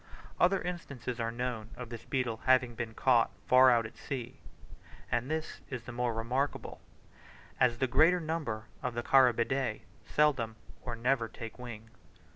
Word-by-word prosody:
Other 185 Hz, +2 st, +4 dB
instances 140 Hz, -9 st, -5 dB
are 115 Hz, 0 st, -1 dB
known 120 Hz, -2 st, -3 dB
of 125 Hz, -2 st, -8 dB
this 115 Hz, -2 st, -8 dB
beetle 125 Hz, -4 st, -1 dB
having 130 Hz, -2 st, +4 dB
been 115 Hz, -1 st, -5 dB
caught 120 Hz, -3 st, +4 dB, 0.2 s
far 130 Hz, +1 st, +7 dB
out 120 Hz, -2 st, +3 dB
at 110 Hz, -, -9 dB
sea; 125 Hz, -2 st, -6 dB, 0.7 s
and 120 Hz, +3 st, 0 dB
this 160 Hz, 0 st, -3 dB
is 125 Hz, -4 st, -5 dB
the 120 Hz, -, -8 dB
more 120 Hz, 0 st, 0 dB
remarkable, 125 Hz, +5 st, -2 dB, 0.8 s
as 120 Hz, -2 st, +3 dB
the 130 Hz, -, +2 dB
greater 160 Hz, +8 st, +4 dB
number 155 Hz, -9 st, -3 dB, 0.2 s
of 125 Hz, -3 st, -3 dB
the 120 Hz, -, -2 dB
Carabidae 125 Hz, -2 st, +3 dB, 0.2 s
seldom 130 Hz, -7 st, +1 dB, 0.3 s
or 120 Hz, -2 st, -5 dB
never 120 Hz, 0 st, +1 dB
take 115 Hz, +1 st, -9 dB
wing. 115 Hz, -2 st, -9 dB
125 Hz, 155 wpm, -31 LUFS, 115-135 Hz, 0.8 s, far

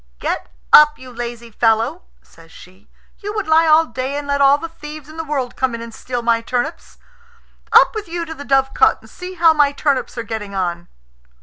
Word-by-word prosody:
"Get 60 Hz, -, -4 dB, 0.2 s
up, 300 Hz, 0 st, +8 dB
you 255 Hz, -1 st, -12 dB
lazy 235 Hz, -1 st, -7 dB
fellow," 230 Hz, +9 st, +1 dB, 0.2 s
says 165 Hz, 0 st, -19 dB
she; 185 Hz, +3 st, -17 dB, 0.3 s
"you 415 Hz, +1 st, -6 dB
would 425 Hz, -, -2 dB
lie 320 Hz, +1 st, +4 dB
all 315 Hz, +1 st, +5 dB
day 260 Hz, +2 st, -4 dB
and 290 Hz, -, -5 dB
let 280 Hz, 0 st, 0 dB
all 280 Hz, +1 st, +6 dB
the 330 Hz, -, -6 dB
thieves 305 Hz, -2 st, -10 dB
in 310 Hz, -, -13 dB
the 325 Hz, -, -3 dB
world 275 Hz, -5 st, -3 dB
come 260 Hz, -3 st, -1 dB
in 230 Hz, -, -7 dB
and 230 Hz, -1 st, -10 dB
steal 245 Hz, 0 st, -5 dB
my 230 Hz, -1 st, +2 dB
turnips. 255 Hz, +8 st, -4 dB, 0.7 s
Up -, -, +6 dB
with 435 Hz, -3 st, -5 dB
you 340 Hz, 0 st, -4 dB
to 320 Hz, -, -7 dB
the 285 Hz, -, -9 dB
dovecot 270 Hz, -, +2 dB
and -, -, -17 dB
see 365 Hz, +1 st, -8 dB
how 330 Hz, -2 st, +5 dB
my 295 Hz, -2 st, +3 dB
turnips 280 Hz, -3 st, -1 dB
are 235 Hz, -, -3 dB
getting 210 Hz, -3 st, -6 dB
on." 175 Hz, -2 st, -3 dB
275 Hz, 210 wpm, -18 LUFS, 235-315 Hz, 0.7 s, up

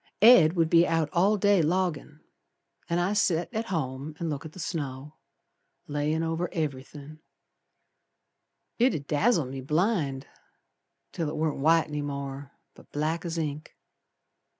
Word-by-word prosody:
Ed 180 Hz, -9 st, +8 dB
would 165 Hz, -2 st, +2 dB
be 170 Hz, +1 st, +5 dB
out 165 Hz, -2 st, 0 dB
all 195 Hz, +5 st, +3 dB
day 205 Hz, -2 st, +3 dB
loggin', 160 Hz, -3 st, -1 dB, 0.7 s
An' 170 Hz, -, +1 dB
I 175 Hz, +3 st, +1 dB
set 180 Hz, -1 st, +1 dB
at 225 Hz, +1 st, -2 dB
home 150 Hz, -4 st, -4 dB
and 165 Hz, -2 st, -3 dB
look 145 Hz, +1 st, -5 dB
at 155 Hz, -, -15 dB
the -, -, -11 dB
snow 150 Hz, -3 st, -5 dB, 0.7 s
Layin' 150 Hz, +2 st, -1 dB
over 165 Hz, +2 st, -2 dB
everythin'; 150 Hz, 0 st, -5 dB, 1.6 s
It 245 Hz, -5 st, +3 dB
'ud 140 Hz, -3 st, -5 dB
dazzle 165 Hz, -, +2 dB
me 135 Hz, +1 st, -6 dB
blind, 150 Hz, -, 0 dB, 0.9 s
Till 160 Hz, -3 st, -3 dB
it -, -, -5 dB
warn't 155 Hz, -2 st, -1 dB
white 165 Hz, +3 st, +4 dB
any 150 Hz, 0 st, -3 dB
more, 140 Hz, -1 st, -6 dB, 0.2 s
but -, -, -19 dB
black 160 Hz, +4 st, -2 dB
as 170 Hz, 0 st, -3 dB
ink. 150 Hz, -1 st, -4 dB
155 Hz, 145 wpm, -27 LUFS, 145-175 Hz, 1.6 s, Ed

